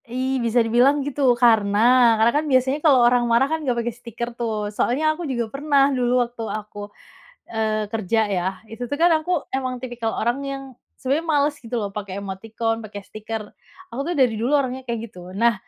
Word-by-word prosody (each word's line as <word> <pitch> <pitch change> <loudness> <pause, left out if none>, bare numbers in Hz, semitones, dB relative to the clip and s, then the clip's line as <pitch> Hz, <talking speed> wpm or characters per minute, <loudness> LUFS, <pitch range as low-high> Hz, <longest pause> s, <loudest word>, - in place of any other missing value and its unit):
Ih, 260 +1 -1
bisa 230 0 +2
dibilang 265 +5 +3
gitu, 285 0 -4 0.2
karena 220 -4 +3 0.4
karena 225 +2 +4
kan 305 - 0
biasanya 260 +2 +2
kalau 260 -5 +6
orang 245 0 +4
marah 235 +3 +4
kan, 320 0 -1
nggak 250 -5 -1
pakai 240 - -2
stiker 235 0 -6
tuh, 235 -2 -3 0.2
soalnya 310 +9 +1
aku 340 +3 -7
juga 240 -3 -1
pernah 280 -1 +2
dulu 245 -1 +1
waktu 235 0 -10 0.2
aku, 205 -1 -9 0.6
eee, 215 -1 0
kerja 220 0 0 0.2
ya, 175 -1 -1 0.3
itu 225 - -9
tuh 285 - -2
kan 345 +1 +5
aku 355 - -4 0.2
emang 255 -1 -2
tipikal 240 -2 -4
orang 240 +3 0
yang 275 -1 -5 0.3
sebenarnya 285 +5 -1
males 290 0 +2
gitu 240 0 -6
loh, 205 -3 -2
pakai 200 -2 -5
emoticon, 225 +3 -3
pakai 210 -2 -8
stiker. 215 0 -6 0.5
Aku 255 - -3
tuh - - 0
dari 255 -4 +4
dulu 270 +5 +3
orangnya 260 -2 -2
kayak 235 -1 -1
gitu. 200 -5 -14 0.2
Nah, 235 +2 +4
240 Hz, 190 wpm, -22 LUFS, 225-270 Hz, 0.6 s, kalau